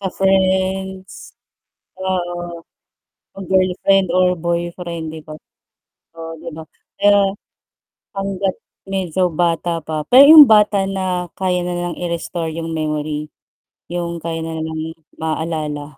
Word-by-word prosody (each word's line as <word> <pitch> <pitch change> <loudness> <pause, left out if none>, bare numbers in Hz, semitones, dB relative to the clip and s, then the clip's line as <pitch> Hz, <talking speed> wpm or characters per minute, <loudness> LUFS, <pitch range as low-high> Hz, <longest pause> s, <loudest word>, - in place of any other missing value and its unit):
Sa 195 - -2
friends. 190 0 -1 0.6
Oo, 175 -2 -3 0.7
o - - -13
girlfriend 190 0 +2
or 180 0 +3
boyfriend 170 -1 -4
'di 160 - -9
ba? 155 0 -10 0.8
Oh, 165 0 -7
'di 170 +1 -8
ba, 160 - -8 0.4
kaya 200 -1 +4 0.8
hangga't 195 -1 -2 0.3
medyo 185 -2 0
bata 170 +1 0
pa 155 -1 -3
pero 265 +3 +9
yung 300 -3 +10
bata 210 -2 +4
na 185 -2 -2
kaya 180 -1 0
nilang 175 0 -3
i-restore 170 -1 -3
yung 165 0 -5
memory. 150 -1 -3 0.6
Yung 170 -1 -4
kaya 165 0 -4
na 160 0 -4
nilang 160 0 -4 0.2
maaalala 155 -3 -4
175 Hz, 115 wpm, -19 LUFS, 165-190 Hz, 0.8 s, yung